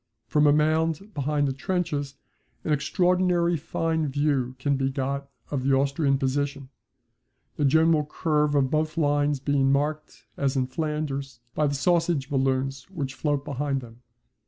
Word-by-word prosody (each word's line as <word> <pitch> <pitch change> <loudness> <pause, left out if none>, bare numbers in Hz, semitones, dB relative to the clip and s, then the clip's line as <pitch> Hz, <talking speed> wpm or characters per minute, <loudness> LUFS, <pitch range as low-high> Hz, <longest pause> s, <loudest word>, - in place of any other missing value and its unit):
From 150 0 +3
a - - +6
mound 160 +6 +1
behind 145 -1 0
the 135 - -1
trenches 145 -2 -2 0.5
an 155 - +1
extraordinary 175 +2 +2
fine 160 +1 -1
view 135 -3 0
can 140 +2 0
be 135 0 0
got 140 +1 -3 0.2
of 140 -3 -1
the 135 0 +3
Austrian 140 +1 +2
position, 140 0 -2 0.9
the 145 - 0
general 160 +2 +4
curve 150 -1 +1
of 135 -2 +2
both 155 +1 0
lines 145 -2 +2
being 135 0 +2
marked, 150 +2 -2
as 140 0 0
in 130 -1 +1
Flanders, 140 -2 -3
by 150 - +1
the 145 - -1
sausage 165 -1 +1
balloons 135 +1 -1
which 145 -8 -4
float 145 +1 -1
behind 140 0 -2
them. 120 0 -13
145 Hz, 150 wpm, -26 LUFS, 135-155 Hz, 0.9 s, a